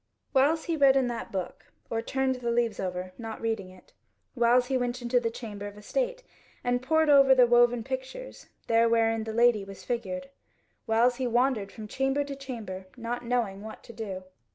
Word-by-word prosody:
Whiles 295 +4 +3
he 335 - -1
read 275 -3 +5
in 265 - +3
that 235 - -5
book, 185 -3 -5 0.2
or 225 0 0
turned 265 +2 0
the 250 -2 -4
leaves 235 -2 0
over, 185 0 -4
not 225 -1 -6
reading 220 -4 -2
it; 185 -1 -18 0.4
whiles 245 0 +4
he 265 +1 -1
went 245 0 -1
into 245 0 +1
the 230 -1 -1
Chamber 210 -3 -7
of 205 0 -10
Estate, - - -2 0.4
and 245 0 +1
pored 315 +4 +2
over 275 -2 +7
the 250 -1 +7
woven 240 -1 +4
pictures 265 - -6 0.2
there 230 0 +3
wherein 225 -1 +2
the 220 - -4
Lady 235 -2 +3
was 195 0 -11
figured. 275 +3 -4 0.6
Whiles 235 +2 +3
he 260 -1 -1
wandered 240 -4 +1
from 215 -2 -9
chamber 270 +5 0
to 280 -1 -6
chamber, 225 -9 -7
not 240 +1 -4
knowing 235 -5 -1
what 220 +1 -9
to 235 - -12
do. 195 -5 -6
240 Hz, 190 wpm, -28 LUFS, 220-265 Hz, 0.6 s, over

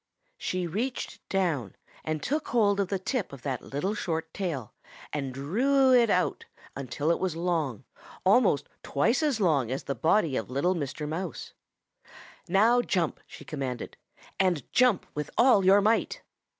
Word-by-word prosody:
"She 185 -1 -2
reached 225 +10 -3
down 160 - -1 0.3
and 155 -1 -3
took 300 +4 -1
hold 205 -4 +2
of 200 - +1
the 195 - -1
tip 205 +3 -2
of 140 -3 -11
that 130 -4 -2
little 180 +9 -3
short 160 -5 -3
tail 155 - -4 0.4
and 140 -3 -2
drew 255 - +2
it 240 -2 +5
out 180 -2 +1 0.3
until 140 +4 -1
it - - +1
was 185 -4 -1
long, 165 - -1 0.4
almost 200 - +4
twice 230 - +1
as 290 -7 +1
long 150 - +2
as 130 +2 -3
the 140 - -2
body 160 - +2
of 110 - -3
little 140 +8 +1
Mr. 150 -2 -4
Mouse. 165 +5 -5 1.0
'Now 225 +6 +4
jump,' 180 -8 -1
she - - -12
commanded, 130 -6 -5 0.4
'and 180 -7 +2
jump 250 -6 +4
with 150 0 -4
all 240 -5 +5
your 195 +2 +6
might.' 220 +3 +1
175 Hz, 155 wpm, -28 LUFS, 145-210 Hz, 1.0 s, your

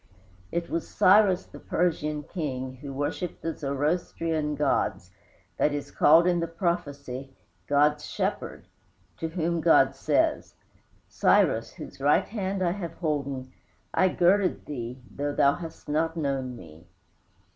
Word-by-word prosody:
It 170 0 -2
was 165 - -3
Cyrus, 190 -1 +4
the - - -13
Persian 150 -4 -1
king, 130 -6 -4
who 140 +1 -8
worshiped 145 +5 -4
the 165 - -1
Zoroastrian 150 +1 -1
gods, 105 -10 0 0.5
that 150 - +2
is 145 - -5
called 165 +3 +6
in 175 -1 +2
the 170 - -1
prophecy 140 -6 -3 0.3
"God's 150 +1 +3
shepherd;" - - -3 0.5
to 165 - -3
whom 170 0 -1
God 135 -5 +5
says, - - 0 0.5
"Cyrus, - - +2
whose - - -10
right 145 +2 +4
hand 195 -3 -3
I 175 - +2
have 175 -4 -5
holden, 140 -5 -3 0.4
I 185 - +4
girded 185 +2 +2
thee, 125 -3 -6 0.2
though 145 0 -2
thou 140 0 +4
hast 165 0 -9
not 160 +2 0
known 135 -4 -2
me." 80 -4 -14
150 Hz, 135 wpm, -27 LUFS, 140-170 Hz, 0.5 s, called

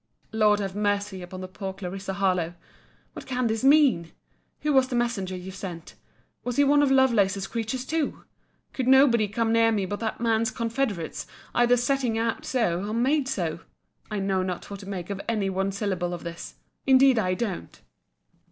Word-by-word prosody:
Lord 210 -2 +3
have 195 -2 -3
mercy 205 -2 -1
upon 185 +1 -8
the 185 - -5
poor 190 +1 -6
Clarissa 190 0 -5
Harlowe! 180 -3 0 0.6
What - - -9
can 255 -1 -1
this 225 +1 -1
mean!—Who 280 - +1
was 265 -1 +4
the 255 - -3
messenger 230 -6 -1
you 185 +1 -7
sent? 175 -3 -8 0.5
Was 245 -1 -3
he 285 - +4
one 290 +1 +4
of 285 - +3
Lovelace's 215 -8 +3
creatures 230 +4 -3
too!—Could 290 -4 -5
nobody 260 -5 +5
come 225 +2 0
near 230 0 +4
me 205 -3 0
but 205 +2 -4
that 220 -1 -3
man's 225 -1 +1
confederates, 225 -7 -3 0.3
either 240 +1 +4
setting 245 -2 0
out 230 0 -1
so, 195 -8 0
or 210 +2 -3
made 265 +4 +2
so? 170 -9 -2 0.5
I 210 - -3
know 195 -1 0
not 185 +1 -4
what 200 - -6
to 195 0 -9
make 185 -1 -5
of 200 0 -4
any 205 -4 0
one 195 +1 -1
syllable 185 -3 -2
of 175 - -10
this! 170 0 -7 0.3
Indeed 265 -2 +6
I 185 -3 0
don't. 205 -4 -4
210 Hz, 175 wpm, -26 LUFS, 190-245 Hz, 0.6 s, Indeed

